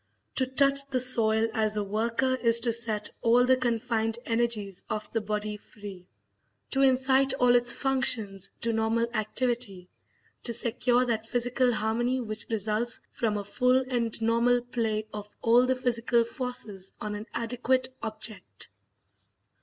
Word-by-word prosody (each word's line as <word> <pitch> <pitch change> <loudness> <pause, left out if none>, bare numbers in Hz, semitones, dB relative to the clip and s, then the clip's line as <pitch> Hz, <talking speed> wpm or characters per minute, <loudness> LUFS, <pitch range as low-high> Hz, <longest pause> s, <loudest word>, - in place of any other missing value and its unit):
To 260 - -1
touch 275 +1 +2
the 265 -2 -1
soil 225 -3 +5
as 215 -1 0
a 210 - 0
worker 230 +5 0
is 235 -2 +4
to 235 -1 +1
set 220 -2 -1
all 240 +2 +4
the 260 +1 +4
confined 230 -2 -1
energies 225 -5 -1
of 215 - -5
the 225 - 0
body 210 0 -3
free, 200 -4 -12 0.6
to 270 - +1
incite 265 0 +3
all 250 -2 +3
its 240 -1 +4
functions 225 -8 0
to 230 0 -1
normal 225 +1 +1
activity, 215 -4 -2 0.5
to 235 - -1
secure 245 +2 +2
that 225 -2 -2
physical 245 +1 +1
harmony 235 +3 -1
which 215 -3 -4
results 220 +2 -1
from 215 -3 -1
a 205 - -4
full 250 +5 +2
and 235 -3 -1
normal 235 +2 +2
play 225 -3 -2
of 210 0 -7
all 240 +2 +4
the 260 - +2
physical 235 -1 +1
forces 230 -6 -6
on 210 0 -4
an 210 +2 -7
adequate 250 +2 0
object. 220 -1 -5
230 Hz, 145 wpm, -27 LUFS, 215-250 Hz, 0.6 s, soil